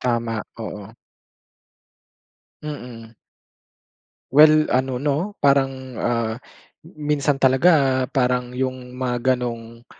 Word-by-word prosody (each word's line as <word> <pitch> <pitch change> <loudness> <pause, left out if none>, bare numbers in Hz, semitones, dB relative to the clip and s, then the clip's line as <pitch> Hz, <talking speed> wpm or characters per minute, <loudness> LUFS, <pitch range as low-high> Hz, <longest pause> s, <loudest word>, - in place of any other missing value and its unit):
Tama, 115 -3 -1 0.2
oo. 105 0 -8 1.7
Mm. 120 -6 -8 1.2
Well 155 +1 +7
ano 130 0 0
'no, 150 +9 -2
parang, 135 -2 +1
ah, 115 -2 0 0.5
minsan 150 -3 -1
talaga 130 -1 +3
parang 125 -1 -1
yung 130 -1 -4
mga 125 0 0
gano'ng, 115 -1 -7
130 Hz, 85 wpm, -22 LUFS, 120-140 Hz, 1.7 s, Well